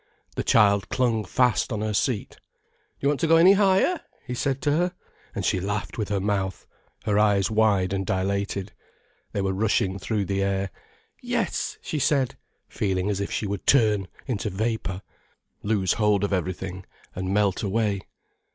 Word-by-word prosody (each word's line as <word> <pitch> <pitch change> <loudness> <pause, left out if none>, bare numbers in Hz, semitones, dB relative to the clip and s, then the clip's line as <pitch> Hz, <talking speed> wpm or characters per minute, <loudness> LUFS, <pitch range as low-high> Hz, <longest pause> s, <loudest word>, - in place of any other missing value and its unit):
The - - -1
child 100 -2 +4
clung 120 -4 +1
fast 125 +4 +1
on 110 -2 -2
her 110 0 -1
seat. 115 +1 -1
"Do - - -43
you 140 - +1
want 145 - 0
to 165 - +1
go 165 - +6
any 175 +4 +7
higher?" 200 - +3 0.3
he 125 - -4
said 135 +2 -1
to 145 - +2
her, 175 +4 +1 0.4
and - - -2
she 95 - +2
laughed 105 +4 -3
with 105 - -2
her 100 -1 0
mouth, 95 -1 -2 0.4
her 105 -1 +2
eyes 105 -1 +3
wide 105 -4 +2
and 95 0 -1
dilated. 100 +1 -2 0.6
They 100 - -1
were 95 0 0
rushing 100 -1 +1
through 105 -2 -1
the 100 +1 -1
air. 100 -1 -1 0.5
"Yes," - - -2
she 155 - -3
said, 135 -2 +1 0.3
feeling 95 0 -1
as 100 - -2
if 100 - -2
she - - -2
would 100 -1 -4
turn 105 -7 +4 0.2
into 110 -4 -2
vapour, 100 -2 -2 0.6
lose 100 -4 +1
hold 105 -2 +2
of 100 - 0
everything, 95 0 -3 0.3
and 95 +1 -3
melt 100 -1 +2
away. 105 -1 0
105 Hz, 170 wpm, -25 LUFS, 95-115 Hz, 0.6 s, any